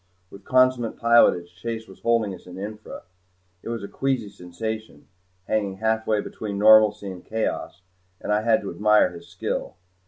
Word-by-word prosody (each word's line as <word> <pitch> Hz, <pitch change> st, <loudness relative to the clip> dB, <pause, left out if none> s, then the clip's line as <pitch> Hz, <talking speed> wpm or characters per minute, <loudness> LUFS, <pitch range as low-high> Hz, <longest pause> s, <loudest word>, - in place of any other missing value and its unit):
With 100 Hz, -, -13 dB
consummate 130 Hz, -2 st, +2 dB
pilotage 105 Hz, -7 st, +4 dB
Chase 115 Hz, +4 st, -5 dB
was 95 Hz, -, -15 dB
holding 115 Hz, -4 st, +1 dB
us 90 Hz, -, -13 dB
in 90 Hz, 0 st, -10 dB
infra. 105 Hz, +2 st, -8 dB, 0.6 s
It -, -, -8 dB
was 115 Hz, -3 st, -4 dB
a -, -, -5 dB
queasy 130 Hz, -5 st, -2 dB
sensation, 110 Hz, +5 st, -7 dB, 0.4 s
hanging 100 Hz, -3 st, -1 dB
halfway 110 Hz, 0 st, 0 dB
between 100 Hz, -1 st, -6 dB
normalcy 105 Hz, -1 st, +5 dB
and 90 Hz, -1 st, -10 dB
chaos, 110 Hz, -4 st, -3 dB, 0.4 s
and 105 Hz, -, -2 dB
I 105 Hz, -, +2 dB
had 110 Hz, 0 st, +2 dB
to 100 Hz, -, -5 dB
admire 105 Hz, +1 st, +3 dB
his 85 Hz, 0 st, -12 dB
skill. -, -, -4 dB
110 Hz, 160 wpm, -24 LUFS, 100-110 Hz, 0.6 s, normalcy